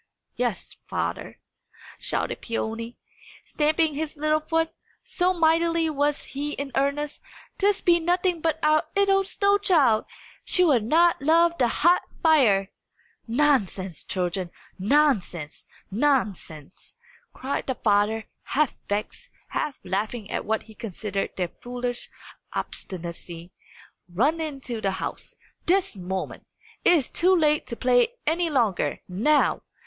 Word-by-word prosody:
"Yes, - - -3
father," - - -3 0.6
shouted - - -2
Peony, 230 0 -4 0.5
stamping 310 +1 +1
his 305 +1 -4
little 305 +1 +2
foot, 325 +1 0 0.3
so 365 0 +1
mightily 330 -1 +2
was 290 0 0
he 290 +2 -4
in 280 -1 -5
earnest, 280 +2 -1 0.4
"this 405 0 +2
be 345 -1 +4
nothing 355 0 +1
but 320 -1 +1
our 305 0 +4
'ittle 395 -1 +3
snow 400 +1 +2
child! 290 - +3 0.4
She 365 - +3
will 290 -8 +4
not 325 +8 +3
love 335 +3 +4
the 245 - +4
hot 345 +9 +3 0.2
fire!" 230 - +4 0.6
"Nonsense, 225 - +1
children, 180 -1 -2 0.3
nonsense, 200 - +1 0.2
nonsense!" 200 - -2 0.3
cried 265 +2 -4
the 260 - -1
father, 210 +1 +1 0.2
half 300 -1 0 0.2
vexed, 210 - -3 0.2
half 300 -3 -3
laughing 210 +3 -3
at - - -2
what 220 0 -1
he 220 - -15
considered 210 -2 -4
their 180 -2 -1
foolish 245 0 -4 0.4
obstinacy. 170 -1 -6 0.6
"Run 285 - +1
into 270 -7 -5
the 195 -2 0
house, - - -6 0.3
this 380 - +2
moment! 190 0 -5 0.4
It - - +6
is 295 -8 +2
too 370 +2 +3
late 300 -3 +2
to 235 - -4
play 250 - +2
any 335 +2 +1
longer, 235 - 0
now. 230 +12 +2
280 Hz, 125 wpm, -25 LUFS, 215-325 Hz, 0.6 s, It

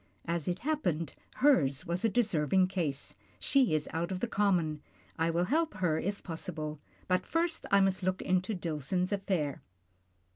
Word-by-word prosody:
As 170 -2 -1
it 180 +1 -1
happened, 205 - -1 0.2
hers 170 - +3
was 175 +1 -2
a 225 - +4
deserving 190 - +2
case 155 -8 -2
— - - -31
she 260 - +3
is 150 - 0
out 170 +3 -1
of 185 - -2
the 240 - -1
common. 175 -8 +1 0.4
I 165 +1 +2
will 170 +1 +1
help 315 - +1
her 170 -5 +1
if 200 +2 -3
possible, 155 -3 -5 0.3
but 185 0 +2
first 330 0 -1
I 200 0 +5
must 195 0 +2
look 185 +1 0
into 185 +3 +1
Dillson's 175 +2 -1
affair. 185 -8 -1
180 Hz, 170 wpm, -31 LUFS, 160-200 Hz, 0.4 s, I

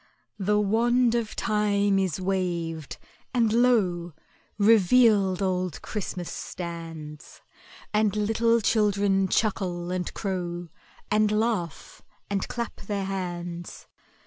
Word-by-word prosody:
The 210 +2 +2
wand 235 +4 +3
of 235 -2 -1
Time 205 -2 +1
is 190 -3 -1
waved, 175 -5 -2 0.4
and 230 -3 +3
lo! 195 -9 +2 0.4
Revealed 205 -2 +4
Old 185 -3 -1
Christmas 185 -4 -4
stands, 165 -3 -7 0.5
And 210 -1 +2
little 225 +2 +2
children 200 -3 +2
chuckle 180 -4 -1
and 180 -1 -2
crow, 175 -3 -3 0.4
And 215 0 +3
laugh 210 -7 -2 0.3
and 195 -1 -1
clap 235 -1 -4
their 200 -1 -3
hands. 175 -2 -5
195 Hz, 100 wpm, -26 LUFS, 175-215 Hz, 0.5 s, Revealed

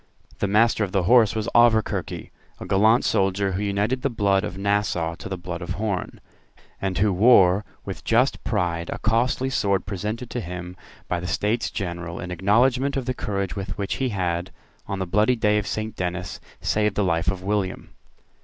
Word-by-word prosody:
The - - +1
Master 110 +2 +3
of 95 - -4
the 95 -2 +2
Horse 115 +2 +5
was 110 0 -2
Auverquerque, 115 -2 +2 0.3
a - - -7
gallant 110 +5 +3
soldier, 95 -1 +1
who 95 +2 -2
united 105 +5 0
the 140 - 0
blood 100 -4 +1
of 90 - -5
Nassau 100 -4 0
to 85 - -9
the 95 - -3
blood 85 0 -6
of 85 - -4
Horn, 100 -4 -3 0.6
and 95 -1 -2
who 100 0 +2
wore 95 -2 +5 0.2
with - - -6
just - - +2
pride 85 -1 -1
a - - -3
costly 125 +4 +1
sword 100 -7 +1
presented 105 +5 -4
to 120 - -3
him 90 -1 -7 0.3
by 90 - -1
the 90 - -5
States 105 +6 0
General 85 -3 -5
in 90 - -6
acknowledgment 125 - +2
of 130 - -2
the 130 - -1
courage 100 -5 -3
with 95 -2 -5
which 100 -1 -2
he 130 -1 0
had, 90 -3 -2 0.4
on 100 - -3
the 95 - -2
bloody 105 +7 +2
day 105 -2 +2
of 105 - -5
Saint 110 0 -3
Dennis, 90 0 -4 0.2
saved 105 -1 +1
the 105 - +1
life 85 -2 +1
of 95 -1 -3
William. 100 -1 -2
100 Hz, 190 wpm, -24 LUFS, 90-110 Hz, 0.6 s, Horse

